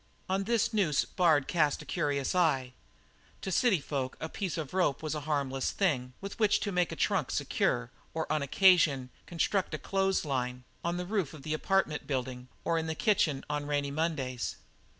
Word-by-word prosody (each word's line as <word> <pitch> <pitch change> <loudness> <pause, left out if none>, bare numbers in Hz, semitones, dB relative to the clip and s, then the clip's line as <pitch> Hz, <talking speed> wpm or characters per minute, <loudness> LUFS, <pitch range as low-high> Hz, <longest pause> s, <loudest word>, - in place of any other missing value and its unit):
On 195 +1 0
this 230 0 +1
noose 180 -9 +2
Bard 160 -7 +3
cast 150 -5 +1
a - - -15
curious 140 -2 -1
eye. 135 -8 +2 0.7
To 190 - -3
cityfolk 150 - +1
a 160 - -4
piece 185 -1 -3
of 155 -2 -5
rope 175 -6 +1
is 155 - -2
a 155 - -2
harmless 135 -3 0
thing 130 -10 0
with 200 +2 -7
which 215 -2 +4
one 200 - -2
may 180 - +3
make 175 - -1
a - - -4
trunk - - +1
secure - - 0 0.2
or 160 0 -2
on 155 - +1
occasion 140 -4 +4 0.2
construct 175 0 0
a - - -3
clothes 195 +1 0
line 125 -3 -2 0.2
on 170 +1 -1
the 180 - -3
roof 190 -6 -1
of 145 - -12
the 155 - -2
apartment 155 -2 0
building, 130 -2 -3 0.2
or 165 -1 +1
in 160 - -3
the 160 - -2
kitchen 155 -8 +2
on 145 0 -2
rainy 145 -1 0
Mondays. 140 -6 -2
155 Hz, 190 wpm, -30 LUFS, 140-185 Hz, 0.7 s, which